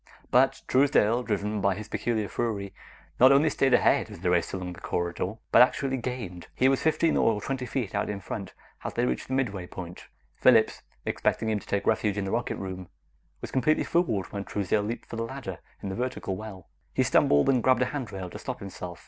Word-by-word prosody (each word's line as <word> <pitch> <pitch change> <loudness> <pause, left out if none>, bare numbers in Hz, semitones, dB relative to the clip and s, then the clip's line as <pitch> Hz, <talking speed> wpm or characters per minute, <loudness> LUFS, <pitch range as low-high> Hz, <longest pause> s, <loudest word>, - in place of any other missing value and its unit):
But - - +3
Truesdale, 125 -4 +3
driven 105 -2 -2
by 100 -1 +2
his 105 +2 -7
peculiar 110 0 -1
fury, 100 -2 -3 0.5
not 130 +2 +8
only 145 +3 +5
stayed 135 -2 +3
ahead - - +3
as - - -10
they 90 - +1
raced 85 -1 +1
along 90 -2 -4
the 85 - -12
corridor, 85 +3 -2 0.2
but - - +8
actually 135 +1 +3
gained. 115 -9 -5
He 130 - +4
was 135 - +1
fifteen 160 +1 +2
or 110 -2 +3
twenty 130 +3 -3
feet 115 -4 -3
out 105 - -1
in 105 -1 -3
front 100 0 -6 0.3
as - - -5
they 120 - +2
reached - - -2
the 130 - -2
midway 100 -9 -1
point. 90 -1 -9 0.3
Phillips, - - +4 0.2
expecting 110 - 0
him 105 - 0
to - - -16
take 100 - -1
refuge 105 -2 +1
in 100 - -1
the 95 - -3
rocket 120 +1 -1
room, 95 -2 -6 0.5
was - - -6
completely 135 +4 +2
fooled 120 - +1
when 100 -1 -3
Truesdale 105 +1 0
leaped 110 +4 -4
for 115 - -7
the 115 - -1
ladder 115 -7 -6 0.2
in 100 - -3
the 95 - -4
vertical 125 -5 -3
well. 95 -4 -9 0.3
He - - +3
stumbled, 70 0 +4
and 130 -3 +3
grabbed 130 +1 +4
a 125 - -3
handrail 100 -10 -5
to - - -8
stop - - -5
himself. 90 -3 -7
105 Hz, 210 wpm, -27 LUFS, 95-125 Hz, 0.5 s, not